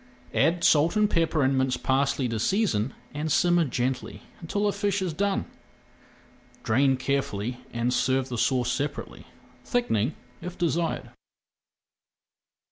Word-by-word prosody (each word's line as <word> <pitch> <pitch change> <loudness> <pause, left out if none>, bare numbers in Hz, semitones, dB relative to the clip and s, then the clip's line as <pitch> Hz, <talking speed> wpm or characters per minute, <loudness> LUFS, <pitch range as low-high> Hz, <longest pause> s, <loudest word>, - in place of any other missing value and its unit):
Add 170 +1 +2
salt 160 +5 +4
and 210 0 +4
pepper 165 -5 +1
and 135 +1 +2
minced 130 -1 0
parsley 135 0 +1
to 115 -1 -2
season 135 - +1 0.2
and 150 +2 -2
simmer 175 +1 +3
gently 125 0 -3 0.2
until 205 +5 -2
the 205 - +2
fish 205 0 0
is 185 -4 -2
done. 200 +3 0 1.2
Drain 130 +3 +3
carefully 125 -3 -2
and 120 +1 0
serve 130 +1 +1
the 125 - -3
sauce 125 0 +1
separately, 145 +2 -4 0.4
thickening 240 - 0 0.3
if 180 0 -7
desired. 170 0 -1
140 Hz, 125 wpm, -26 LUFS, 125-175 Hz, 1.2 s, salt